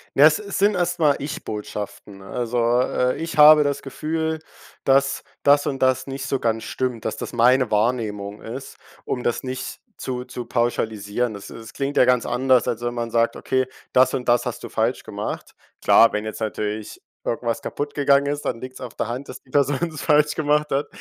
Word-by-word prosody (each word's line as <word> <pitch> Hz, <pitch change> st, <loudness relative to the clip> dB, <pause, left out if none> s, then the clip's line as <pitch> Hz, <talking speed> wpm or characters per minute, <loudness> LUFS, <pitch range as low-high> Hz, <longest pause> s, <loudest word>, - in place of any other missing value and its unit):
Na, 140 Hz, -, +8 dB
es 155 Hz, 0 st, +6 dB
es 200 Hz, -2 st, -5 dB
sind 205 Hz, +1 st, +4 dB
erst 175 Hz, -1 st, 0 dB
mal 150 Hz, -3 st, +4 dB
Ich-Botschaften. 105 Hz, -6 st, -6 dB
Also, 120 Hz, +4 st, -2 dB, 0.2 s
äh: 125 Hz, 0 st, 0 dB
Ich 165 Hz, 0 st, -5 dB
habe 150 Hz, 0 st, +9 dB
das 145 Hz, -1 st, -1 dB
Gefühl, 160 Hz, +3 st, -3 dB, 0.4 s
dass 140 Hz, +1 st, +2 dB, 0.2 s
das 145 Hz, 0 st, +4 dB
und 135 Hz, -, -3 dB
das 130 Hz, 0 st, +2 dB
nicht 135 Hz, 0 st, -5 dB
so 135 Hz, -, 0 dB
ganz 115 Hz, -2 st, 0 dB
stimmt, 125 Hz, -3 st, -3 dB
dass 110 Hz, -, -2 dB
das -, -, -6 dB
meine 125 Hz, +2 st, +4 dB
Wahrnehmung 105 Hz, -2 st, -1 dB
ist, 130 Hz, +4 st, -8 dB, 0.3 s
um 125 Hz, -, -3 dB
das 120 Hz, -, 0 dB
nicht 130 Hz, 0 st, -5 dB, 0.2 s
zu 125 Hz, -1 st, -4 dB
zu 125 Hz, -1 st, -7 dB
pauschalisieren. 115 Hz, -1 st, -1 dB
Das 100 Hz, -1 st, -9 dB
das 110 Hz, -1 st, -10 dB
klingt 140 Hz, +1 st, -3 dB
ja -, -, +7 dB
ganz 125 Hz, -1 st, +3 dB
anders, 125 Hz, +1 st, +3 dB
als 120 Hz, -2 st, -2 dB
wenn 120 Hz, 0 st, -2 dB
man 120 Hz, -1 st, -3 dB
sagt: 115 Hz, +1 st, +1 dB
„Okay, 130 Hz, 0 st, 0 dB, 0.3 s
das 130 Hz, 0 st, +4 dB
und 125 Hz, -2 st, -2 dB
das 120 Hz, 0 st, +3 dB
hast -, -, -5 dB
du -, -, -6 dB
falsch -, -, 0 dB
gemacht.“ -, -, -6 dB, 0.3 s
Klar, 115 Hz, -, +6 dB
wenn 105 Hz, 0 st, -2 dB
jetzt 110 Hz, +1 st, -6 dB
natürlich 105 Hz, -1 st, -4 dB, 0.2 s
irgendwas 115 Hz, -1 st, -2 dB
kaputt 145 Hz, 0 st, -4 dB
gegangen 140 Hz, 0 st, +3 dB
ist, 145 Hz, +1 st, -3 dB
dann 115 Hz, -, -2 dB
liegt's 130 Hz, 0 st, -8 dB
auf 125 Hz, -3 st, -7 dB
der -, -, -2 dB
Hand, 125 Hz, +4 st, -5 dB
dass -, -, -9 dB
die 130 Hz, -, -27 dB
Person 140 Hz, 0 st, +2 dB
das 155 Hz, -3 st, -8 dB
falsch 150 Hz, -1 st, +3 dB
gemacht 150 Hz, 0 st, +1 dB
hat. 140 Hz, +2 st, 0 dB
130 Hz, 200 wpm, -23 LUFS, 115-145 Hz, 0.4 s, habe